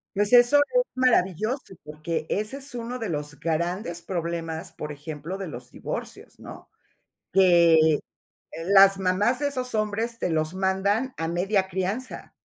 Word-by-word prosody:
Pues 205 +3 0
eso 245 +3 +7
es - - +3
maravilloso 225 - +1
porque 155 +2 -4
ese 215 +6 -1
es 275 -2 -5
uno 240 +1 -5
de 225 - -3
los 150 -4 -5
grandes 170 +2 -2
problemas, 170 -1 -4
por 150 -1 -6
ejemplo, 150 +4 -7
de 195 -1 -5
los 125 -5 -9
divorcios, - - -7
¿no?, - - -11 0.6
que 170 -4 +5 0.7
las 195 +1 +6
mamás 195 +6 +1
de 290 - 0
esos 255 -4 -2
hombres 220 +2 -1
te 180 - -2
los 155 +2 -1
mandan 200 +6 0
a 165 - -2
media 190 +3 0
crianza. 190 +7 -4
190 Hz, 145 wpm, -25 LUFS, 165-225 Hz, 0.7 s, eso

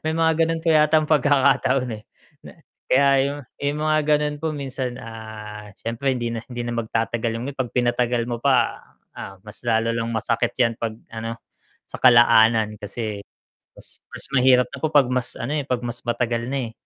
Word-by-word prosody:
May 160 0 0
mga 165 0 +3
gano'n 165 0 -2
po 165 - -1
yatang 155 0 +4
pagkakataon, 135 -3 +3
eh. - - -16 0.4
Na - - -10 0.4
kaya 140 +2 +4 0.2
'yong 140 +1 -3 0.2
'yong 145 +1 -1
mga 155 0 +3
gano'n 150 0 +1
po 155 0 -3
minsan, 130 -3 -4
ah, 110 -2 -9
siyempre 125 +4 -1
hindi 120 -2 -2
na 115 - -3
hindi 120 -1 -5
na 120 0 -4
magtatagal 115 +1 -1
'yong 115 - -4
gano'n. 140 - -14
'Pag 125 -3 -3
pinatagal 120 -1 +1
mo 120 - -2
pa, 130 +1 +2 0.4
ah, 95 - -7
mas 105 -1 -7
lalo 115 0 +2
lang 115 0 -2
masakit 115 +1 0
'yan 115 -2 +2
'pag, 115 -2 -3 0.2
ano, 115 0 -5 0.6
sa - - -7
kalaanan. 115 -3 +5
Kasi 105 0 -5 0.6
mas - - -5
mas - - -3
mahirap 125 -1 +5
na - - -5
po 155 - +1
'pag 145 -4 +5
mas 125 -1 -2
ano, 130 +6 -3
eh, 150 - 0
'pag 125 -3 -1
mas 120 0 -4
matagal 120 0 -1
na, 140 - -1
eh. - - -19
120 Hz, 190 wpm, -23 LUFS, 115-140 Hz, 0.6 s, kalaanan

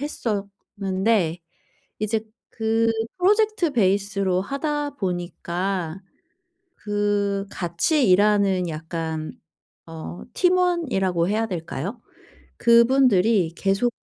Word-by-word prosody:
했었는데 200 - -2 0.6
이제 215 +1 0 0.3
그 225 0 +1 0.3
프로젝트 415 -3 +2
베이스로 195 -4 +1
하다 295 +4 -2
보니까 180 - -3 0.8
그 205 -1 -1
같이 190 - 0
일하는 195 -2 +3
약간 160 0 -4 0.6
어 165 +1 -8
팀원이라고 335 - +1
해야 220 +2 +1
될까요? 180 - -5 0.6
그분들이 230 -6 +4
계속 195 +6 0
200 Hz, 190 characters per minute, -23 LUFS, 180-235 Hz, 0.8 s, 그분들이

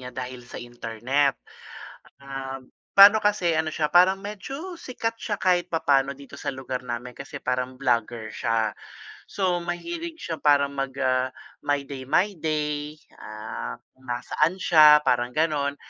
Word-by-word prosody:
niya 125 - -7
dahil 125 -1 -5
sa - - -9
internet. 120 +4 -1 0.8
Um, 135 -1 -7 0.3
pa'no 205 +2 +9
kasi 195 -5 +2
ano 160 0 0
siya 155 -1 0
parang 185 +3 +5
medyo 270 - -7
sikat 245 -7 -4
siya 210 -3 -4
kahit 180 -1 +1
papaano 140 -4 +2
dito 140 0 -13
sa - - -4
lugar 130 -1 -5
namin 125 0 -6
kasi 140 +1 -8
parang 125 0 -2
vlogger 120 -3 0
siya. 110 -2 0 0.5
So, 185 -3 0
mahilig 325 - -5
siya 165 -1 -4
parang 140 -1 +3
mag, 135 -1 -4
ah, 130 0 +2 0.3
mag-my 145 -1 -1
day 135 -1 -8
my 185 +8 +3
day, 150 -1 -2 0.2
ah, 105 - -6 0.2
kung 130 0 -23
nasaan 150 +8 0
siya 150 -2 +7
parang 120 -1 +1
ganon. 150 -3 +1
140 Hz, 145 wpm, -25 LUFS, 130-175 Hz, 0.8 s, pa'no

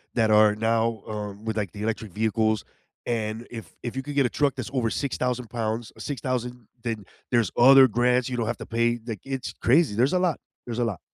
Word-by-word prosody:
that 110 -2 +3
are 105 0 +6
now, 115 0 0
um, 105 -1 -6
with, 110 -1 -2
like, 100 -5 -2
the 105 - -7
electric 110 -1 -3
vehicles, 110 0 +1 0.4
and 115 0 -2
if 115 -2 -8
if 120 0 -4
you 135 - -3
could 145 +1 -6
get 140 -2 +4
a - - +1
truck 145 +1 +1
that's - - -5
over 125 -4 +1
6,000 125 -2 -2
pounds, 115 0 -3
or - - -17
6,000, 125 -4 -3 0.2
then 110 -4 -3 0.3
there's 120 -3 +3
other 135 +2 +8
grants, 125 +2 +2
you 125 - -3
don't 115 - 0
have 120 -1 -2
to - - -8
pay, 115 +1 +1
like, 110 -4 -4
it's 135 -1 -4
crazy, 135 -3 +4
there's 125 - +2
a 180 - +3
lot, 180 -4 +1 0.3
there's 120 -1 -4
a - - +2
lot. 105 -8 -2
115 Hz, 220 wpm, -25 LUFS, 110-125 Hz, 0.4 s, other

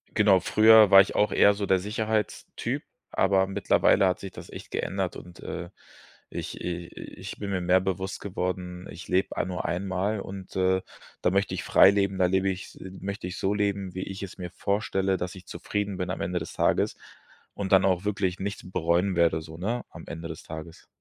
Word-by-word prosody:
genau, - - +5
früher 110 -1 +7
war 95 - +9
ich 100 - -1
auch 105 - +3
eher 100 - +5
so 100 0 -3
der 95 - +4
Sicherheitstyp, 110 +2 -2 0.3
aber 95 0 +3
mittlerweile 95 0 +3
hat 90 - 0
sich 95 -1 -7
das - - -11
echt - - -10
geändert - - -2
und, 90 -1 -11
äh, - - -6 0.6
ich - - -6
i 85 -1 -4
i - - -10
ich - - -7
bin 100 -1 -4
mir 95 - -1
mehr 90 +1 +4
bewusst 95 0 -3
geworden, 90 -2 -4
ich 85 - -9
lebe 95 +1 0
ei - - +1
nur 90 -1 -4
einmal 95 +4 -1
und, 95 -1 -9
äh, 95 0 +2 0.4
da - - +3
möchte 100 +2 +1
ich - - -3
frei 95 - +7
leben, 100 -1 0
da 90 - +3
lebe 95 +2 +2
ich's 95 +1 -6 0.2
möchte 100 -1 -5
ich 90 - -6
so 95 - 0
leben, 100 -2 -1
wie 95 - -4
ich 95 0 -6
es 95 - -8
mir 90 -1 -5
vorstelle, 95 0 0
dass 90 +1 -4
ich 90 -2 -12
zufrieden 105 -2 -3
bin 90 -1 -3
am 95 - -3
Ende 90 +1 -1
des 80 - -7
Tages - - +1 0.6
und 100 -2 -4
dann 95 -1 +6
auch 95 0 +1
wirklich 100 -3 -1
nichts 100 -1 -5
bereuen 90 +2 +1
werde, 85 -1 +3
so, 80 0 -10
ne, 115 +8 -2
am - - -11
Ende 85 0 -6
des 80 +3 -8
Tages. 80 +1 -9
95 Hz, 205 wpm, -27 LUFS, 90-100 Hz, 0.6 s, war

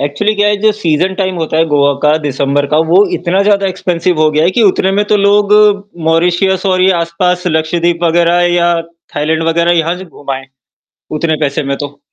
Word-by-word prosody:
Actually 145 +10 -1
क्या 205 0 +1
है 210 - +1
जो 215 +1 +3
सीज़न 185 -2 -1
टाइम 190 -2 -2
होता 160 -1 -3
है 165 - +3
गोआ 145 -1 +3
का 150 0 +3
दिसंबर 140 -1 -1
का, 150 +2 0
वो 170 +5 +3
इतना 185 +3 0
ज़्यादा 200 -1 +1
एक्सपेंसिव 180 -3 -2
हो 155 - +3
गया 155 +1 +1
है, 175 - +3
कि 230 +5 0
उतने 190 -2 +2
में 205 - +2
तो 210 - +2
लोग 205 0 +2 0.5
मॉरिशियस 175 +3 +1
और 185 -1 +1
ये 190 - +4
आस-पास 180 +2 -1
लक्षद्वीप 170 +1 -1
वग़ैरह 170 +1 +2
या 175 0 +2 0.4
थाईलैंड 155 +2 -1
वग़ैरह 170 +1 +1
यहाँ 165 +2 -1
से 185 - -9
घूम 145 -5 -11
आए, 135 0 -5 0.7
उतने 155 +1 -1
पैसे 140 0 -1
में 140 0 -2
तो। 145 0 -8
170 Hz, 205 wpm, -12 LUFS, 155-190 Hz, 0.7 s, ये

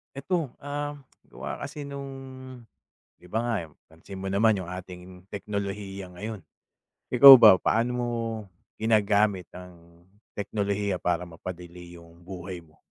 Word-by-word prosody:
Ito, 150 0 -2
ah, 145 +1 -5 0.3
gawa - - -6
kasi 145 0 -7
nung 140 -1 -7 1.0
di 90 - -19
ba 110 - 0
nga, 120 - 0 0.3
pansin 80 +4 -12
mo 95 - -6
naman 100 +2 +3
yung 95 - -6
ating 90 0 -9
teknolohiya 100 -2 -5
ngayon. 105 -1 -6 0.7
Ikaw 135 +2 +11
ba 105 -5 +9
paano 115 +6 +1
mo 120 -1 -1 0.7
ginagamit 105 -4 +2
ang 85 -1 -14 0.3
teknolohiya 100 -2 -2
para 90 0 0
mapadali 85 0 -10
yung 85 0 -17
buhay 90 0 -8
mo? 80 -1 -24
100 Hz, 125 wpm, -26 LUFS, 90-110 Hz, 1.0 s, Ikaw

